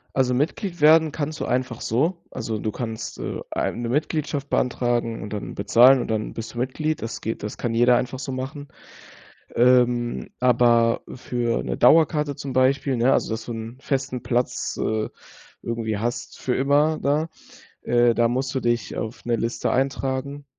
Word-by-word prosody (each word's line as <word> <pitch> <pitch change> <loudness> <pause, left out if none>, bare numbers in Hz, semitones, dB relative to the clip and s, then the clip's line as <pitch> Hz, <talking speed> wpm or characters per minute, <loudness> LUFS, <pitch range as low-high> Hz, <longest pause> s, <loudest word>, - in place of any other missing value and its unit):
Also 130 -1 +2
Mitglied 170 - -2
werden 155 0 +6
kannst 155 +1 -3
du - - -2
einfach 125 -1 -1
so. 155 - 0
Also 110 -3 -4
du 110 - -2
kannst, 115 -1 -5
äh, - - -4
eine 120 0 -2
Mitgliedschaft 145 0 -1
beantragen 120 -2 0
und 105 - -7
dann 105 - -5
bezahlen 125 +6 +6
und - - -5
dann 110 -1 -2
bist 115 +1 -7
du - - -10
Mitglied. 155 +5 -2
Das 115 +1 -5
geht 110 -1 -4
das 105 - -5
kann 120 -2 -2
jeder 120 +2 +5
einfach 125 +1 -2
so 135 0 -5
machen. 135 +3 -5 0.9
Ähm, 120 -1 +3
aber 120 -2 +4
für 120 -2 -2
'ne - - -3
Dauerkarte 150 +1 +4
zum 135 -1 -6
Beispiel, 130 +1 +2
ne, 120 +3 +3
also - - 0
dass 110 - -5
du - - -6
'n 115 +2 -7
festen 130 -2 -2
Platz, 125 0 -1
äh, 110 0 -1 0.5
irgendwie 115 -2 -2
hast 120 +4 -4
für 125 - -1
immer 145 +3 +2
da 150 +3 +1 0.6
äh, 120 -1 +3
da 115 0 +3
musst 130 +2 -2
du 130 - 0
dich 120 -5 -1
auf 110 +1 -5
'ne 120 -1 +1
Liste 115 +2 -1
eintragen, 135 +1 -2
125 Hz, 170 wpm, -23 LUFS, 115-140 Hz, 0.9 s, werden